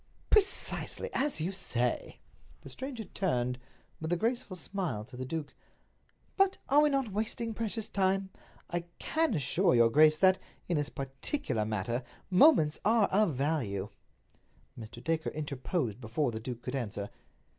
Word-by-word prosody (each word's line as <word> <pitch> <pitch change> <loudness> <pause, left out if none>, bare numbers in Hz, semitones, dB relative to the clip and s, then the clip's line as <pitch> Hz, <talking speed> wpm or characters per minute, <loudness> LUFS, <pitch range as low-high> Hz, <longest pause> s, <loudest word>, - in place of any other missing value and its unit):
"Precisely—as 380 - +2
you 175 +4 -1
say!" 125 -10 -2 0.4
The 135 - -11
stranger 255 - -6
turned, 125 - -1 0.4
with 160 - -4
his 175 0 0
graceful 230 -3 -1
smile, 165 - -3
to 125 - -13
the 130 +1 -5
duke: 160 0 -4 0.8
"But 390 -1 +3
are 290 +2 +6
we 300 - +4
not 270 -6 0
wasting 220 +2 -2
precious 225 0 -2
time? 190 0 0 0.4
I 175 0 -2
can 320 -8 0
assure 170 +4 +2
your 115 -1 +5
grace 155 +3 +6
that, 190 +2 +5 0.3
in 175 - +1
this 145 -1 -1
particular 135 - -2
matter, 110 +3 -1 0.3
moments 180 - +5
are 220 0 +4
of 195 -6 +2
value." 125 -9 -1 0.9
Mr. 115 +1 -10
Dacre 160 -1 0
interposed 135 - -3
before 120 +4 -1
the 110 - -4
duke 120 +1 -6
could 125 - -4
answer. 105 -5 -4
160 Hz, 145 wpm, -31 LUFS, 125-210 Hz, 0.9 s, are